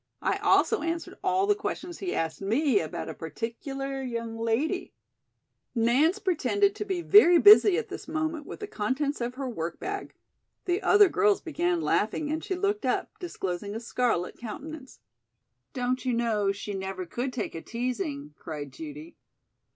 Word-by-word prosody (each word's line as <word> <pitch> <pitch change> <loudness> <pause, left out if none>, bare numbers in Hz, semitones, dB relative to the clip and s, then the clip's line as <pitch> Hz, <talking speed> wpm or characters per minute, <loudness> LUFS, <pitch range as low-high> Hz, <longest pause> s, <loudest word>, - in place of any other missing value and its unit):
"I - - +1
also 445 - +3
answered 335 0 -4
all 380 +1 +2
the 415 - +4
questions 355 -4 -5
he 370 -2 -3
asked 165 +2 -2
me 230 +4 +2
about 155 - -4
a - - -5
particular 270 - -5
young 230 -3 -4
lady 230 +11 -1 0.4
" - - -52
Nance 310 +10 +3
pretended 400 +1 +1
to 420 0 -5
be 370 -4 -2
very 355 -3 +7
busy 410 0 +8
at 470 - -3
this - - -7
moment 315 -1 -2
with - - -8
the 415 - -4
contents 270 - -2
of 240 +1 -3
her 270 0 -4
work 170 -9 -4
bag. 400 +1 -5 0.5
The 360 +3 0
other 410 -2 +6
girls 410 +2 +3
began 345 +1 -1
laughing 295 +7 0
and 315 +1 -2
she 375 - -2
looked 405 +3 -1
up, - - 0
disclosing 200 - -4
a - - -2
scarlet 235 -6 -1
countenance. 265 - -8 0.7
"Don't 250 0 -1
you 255 -2 0
know 220 -4 +1
she 200 +1 -6
never 190 -1 -4
could 245 +9 -3
take 250 - -4
a 165 - -6
teasing?" 195 - -4
cried 145 -4 -7
Judy. 150 +3 -9
265 Hz, 165 wpm, -28 LUFS, 210-350 Hz, 0.7 s, busy